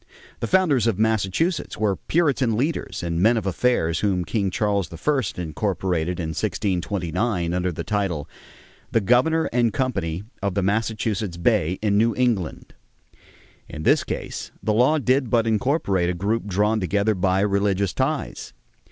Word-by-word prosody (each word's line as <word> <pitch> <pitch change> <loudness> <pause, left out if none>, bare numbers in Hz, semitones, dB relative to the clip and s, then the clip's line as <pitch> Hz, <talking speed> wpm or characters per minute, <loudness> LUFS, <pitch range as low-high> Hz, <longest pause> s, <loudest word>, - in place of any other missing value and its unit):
The - - -2
founders 155 - +3
of 110 -5 +1
Massachusetts 110 - 0
were 105 -3 +1
Puritan 135 - +1
leaders 145 - -2
and 85 0 -1
men 115 +4 +4
of 110 - -2
affairs 95 -5 +1
whom 95 -4 0
King 100 -4 0
Charles 100 -3 -1
I 135 - 0 0.2
incorporated 90 0 -2
in 80 -2 -2
1629 90 +1 -1
under 90 0 0
the 80 - -5
title: 95 -8 -2 0.6
"The - - +3
governor 130 +10 +3
and 120 -2 +2
company 105 - -2 0.2
of 100 -2 -1
the 100 - +1
Massachusetts 105 -2 -1
Bay 90 -2 +1
in 100 -1 +3
New 115 +1 +2
England." 115 -10 -1 1.0
In 80 -2 -7
this - - +4
case - - -5
the 110 - +1
law 125 +8 +4
did 130 -2 +1
but 115 0 +2
incorporate 110 - +1
a 90 - -1
group 105 +5 -1
drawn 105 +3 +1
together 100 +3 +1
by 95 0 +1
religious 100 -1 +1
ties. 140 +3 -2
105 Hz, 150 wpm, -23 LUFS, 90-120 Hz, 1.0 s, men